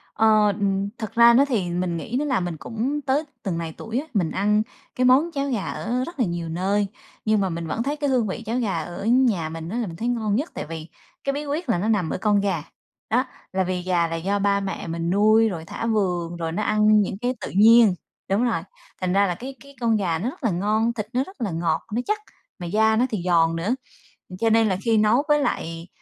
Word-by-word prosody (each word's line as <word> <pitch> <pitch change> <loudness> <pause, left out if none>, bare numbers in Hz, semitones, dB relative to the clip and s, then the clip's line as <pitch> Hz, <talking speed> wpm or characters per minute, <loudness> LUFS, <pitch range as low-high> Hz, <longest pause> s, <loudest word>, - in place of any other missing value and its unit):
Ờ, 215 -1 +5
ừm, 195 0 0
thực 220 0 -6
ra 235 0 +7
nó 275 +4 +5
thì 210 -10 -1
mình 175 -1 -1
nghĩ 230 +8 -5
nó 300 - -1
là 260 -7 +1
mình 175 -3 -3
cũng 255 - -3
tới 285 +3 +1 0.2
từng 180 -5 -2
này 165 -1 -4
tuổi 225 +3 -3
á, 305 - -6
mình 175 -6 +1
ăn 210 +2 +2 0.3
cái 255 - +1
món 275 +7 +5
cháo 280 -1 -2
gà 225 -6 -1
ở 245 +3 -2
rất 340 -5 -10
là 240 - +3
nhiều 170 -1 -3
nơi, 195 +4 0 0.4
nhưng 215 -1 +3
mà 190 - 0
mình 165 -1 -4
vẫn 230 +8 -2
thấy 285 +2 -1
cái 290 -1 -1
hương 245 -5 +2
vị 225 +5 -5
cháo 230 +3 -1
gà 195 -8 -1
ở 175 +5 -7
nhà 230 -10 +3
mình 165 +1 -6
á 230 - -3
là 230 -4 -1
mình 165 - -7
thấy 230 +7 -3
ngon 220 -4 0
nhất 290 +8 -1
tại - - -5
vì 160 0 -7 0.4
cái 275 - 0
bí 295 +1 -4
quyết 290 0 -3
là 175 - +3
nó 205 +5 -1
nằm 200 -7 +1
ở - - -2
con 205 +1 +2
gà, 180 -6 -1 0.5
đó. 250 +5 +2 0.3
Là 190 0 +2
vì 180 0 -2
gà 175 -2 +1
là 165 - -3
do 195 +5 -1
ba 200 0 +2
mẹ 195 -3 -4
mình 165 +1 -2
nuôi, 215 +3 +4
rồi 165 -4 -6
thả 230 - -5
vườn, 180 -6 0
rồi 165 -1 -3
nó 210 +6 -2
ăn 215 0 +4
những 195 0 -2
cái 250 +1 0
tự - - -5
nhiên 220 0 +6 0.3
Đúng 205 +5 +2
rồi. 225 -9 +1 0.4
Thành 180 0 0
ra 200 0 +4
là 175 - -1
cái 265 +5 -8
cái 280 0 -16
con 230 -2 +2
gà 170 -5 0
nó 235 +7 -1
rất 270 - -12
là 225 - +2
ngon, 215 +6 +1
thịt 210 -3 -4
nó 255 +2 +2
rất 380 -7 -14
là 205 -6 -1
ngọt, 165 -1 0
nó 240 - +1
chắc, 425 0 0 0.4
mà 175 - -5
da 220 +4 +3
nó 245 +3 +3
thì 200 -6 -3
giòn 165 -2 +3
nữa. 200 +10 0 0.7
Cho 225 -1 +2
nên 225 -1 +4
là 185 - +1
khi 225 -1 +3
nấu 215 +6 +4
với 295 0 +4
lại 165 -9 -3
210 Hz, 255 wpm, -23 LUFS, 175-235 Hz, 0.7 s, ra